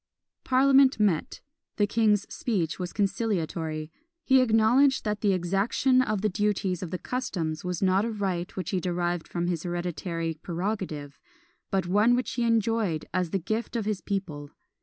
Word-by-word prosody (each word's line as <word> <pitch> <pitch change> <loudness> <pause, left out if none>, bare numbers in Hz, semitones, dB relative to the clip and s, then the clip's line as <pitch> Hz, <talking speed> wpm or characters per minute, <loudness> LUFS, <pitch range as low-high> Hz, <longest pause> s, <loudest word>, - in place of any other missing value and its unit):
Parliament 270 0 +4
met. 195 -7 0 0.4
The 205 - +3
king's 210 -1 +2
speech 180 -10 -1
was 180 -1 -4
conciliatory. 170 -7 -2 0.3
He 265 -3 +5
acknowledged 250 +4 +3
that 210 -1 -2
the 205 - +3
exaction 195 +8 +2
of 215 -5 -1
the - - +4
duties 200 -2 -1
of 180 - -4
the 185 - -3
customs 175 -11 -3
was 180 0 -3
not 190 +1 +3
a 230 - -1
right 190 -5 -3
which 185 - -4
he 190 - +1
derived 175 -1 -2
from 170 0 -2
his 175 -3 -1
hereditary 175 -1 -3
prerogative, 175 -6 -4 0.5
but 190 -3 0
one 210 +7 +4
which 250 - -2
he 245 - -3
enjoyed 225 -7 +1
as 180 -2 0
the 195 - 0
gift 220 +7 -3
of 225 -3 -1
his 210 -2 -2
people. 160 -8 -4
195 Hz, 160 wpm, -27 LUFS, 175-220 Hz, 0.5 s, He